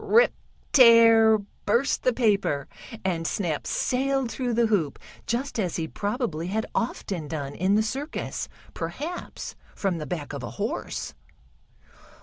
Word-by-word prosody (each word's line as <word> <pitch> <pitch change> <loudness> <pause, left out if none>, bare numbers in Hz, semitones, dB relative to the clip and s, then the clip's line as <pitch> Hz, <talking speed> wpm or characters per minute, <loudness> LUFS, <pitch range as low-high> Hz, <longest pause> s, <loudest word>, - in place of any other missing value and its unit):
"Rip! 475 +2 +5 0.4
Tear!" 230 -3 +8 0.3
burst 240 +6 +2
the 255 - +3
paper, 200 - +1 0.4
and 165 -3 0
Snap 165 -7 -2
sailed 265 -1 0
through 245 -2 -1
the 235 0 +4
hoop 195 -10 +1 0.3
just 245 +1 -2
as 180 -5 -1
he 160 -2 -2
probably 200 - -2
had 220 +4 -1
often 190 -8 -2
done 145 -3 -4
in 190 +5 +2
the 215 - +3
circus, 270 +8 -4 0.2
perhaps 285 - -5 0.2
from 185 -4 -1
the 150 - -5
back 160 -5 -4
of - - -4
a - - -5
horse. - - -3
215 Hz, 135 wpm, -26 LUFS, 170-245 Hz, 0.4 s, Tear